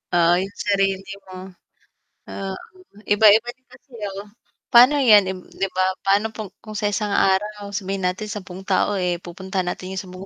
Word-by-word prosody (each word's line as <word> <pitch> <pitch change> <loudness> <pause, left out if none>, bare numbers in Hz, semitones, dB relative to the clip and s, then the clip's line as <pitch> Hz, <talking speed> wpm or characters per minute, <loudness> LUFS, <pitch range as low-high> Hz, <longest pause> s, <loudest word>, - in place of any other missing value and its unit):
Oo, 170 0 +4
yung 195 +1 -5
sarili 195 -1 0 0.2
mo. 185 0 -10 0.8
Ah, 195 -1 -5 0.6
iba-iba 215 +3 +5
din 260 0 -44
kasi 275 - -20 0.3
oh 205 - -10 0.5
pa'no 250 +5 +8
yan 215 -6 +7
im 185 - -7
'di 195 - -1
ba 185 - +2 0.2
pa'no 205 +3 +1 0.3
kung 215 -1 -9
sa 205 0 0
isang 205 0 -2
araw, 205 +2 +1
sabihin 195 -1 -4
natin 190 +4 -5
10 190 -2 -8
tao 200 +1 +1
eh, 180 -2 -1
pupuntahan 190 +1 -4
natin 185 +1 -6
yung 190 - -2
sa 185 - -13
mu 185 +1 -9
195 Hz, 170 wpm, -22 LUFS, 185-210 Hz, 0.8 s, pa'no